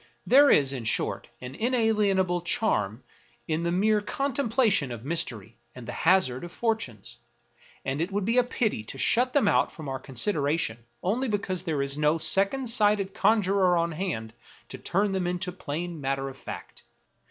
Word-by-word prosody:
There 280 +2 +6
is, 140 -2 +4
in 125 -4 -5
short, - - -1
an 125 +1 -7
inalienable 210 - +1
charm 140 - 0 0.4
in 160 0 -1
the 170 0 -1
mere 210 +4 +2
contemplation 235 - +1
of 120 0 -7
mystery 120 - -4 0.2
and 125 -2 -10
the - - -4
hazard 165 -8 +2
of 175 - -7
fortunes; 120 - -3 0.7
and 135 +3 -2
it 175 +4 -2
would 200 0 -1
be 230 +4 +3
a - - +4
pity 220 - -1
to 135 - -7
shut 245 - +2
them 280 -8 +3
out - - +3
from 155 -3 -9
our 135 -1 -3
consideration 140 - -1 0.2
only 235 +8 0
because 200 -4 -2
there 155 -6 -1
is 140 +1 +1
no 150 +2 +3
second 200 +10 +1
sighted 210 -4 +2
conjurer 195 -3 +3
on 170 0 0
hand 155 - -4 0.4
to - - -8
turn 200 +3 0
them 190 -2 -1
into 180 +1 -2
plain 170 -1 -5
matter 135 0 -2
of 135 - -11
fact. - - -9
175 Hz, 170 wpm, -27 LUFS, 140-210 Hz, 0.7 s, There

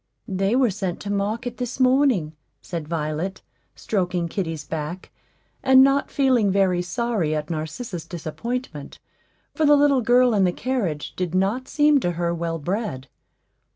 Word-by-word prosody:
"They 195 +3 0
were 255 -4 +3
sent 190 -3 -3
to 200 - -4
market 220 +5 -2
this 250 +1 -4
morning," 255 - +3 0.3
said 165 -4 -6
Violet, 160 +3 -3 0.3
stroking 180 -4 -1
kitty's 165 -5 -4
back, 160 +3 -5 0.5
and 265 0 +7
not 275 +1 +2
feeling 255 -7 +2
very 185 -2 +2
sorry 195 -5 -1
at 150 +1 -4
Narcissa's 165 - -5
disappointment, 175 - -5 0.6
for 315 - -1
the 295 -1 +6
little 285 -2 +4
girl 245 +1 +4
in 200 -2 +3
the 180 - +3
carriage 195 - -3
did 180 -1 -3
not 205 +8 0
seem 295 -1 +4
to 175 -8 -1
her 170 0 -1
well 165 -1 -2
bred. 165 - -4
195 Hz, 150 wpm, -23 LUFS, 170-245 Hz, 0.6 s, and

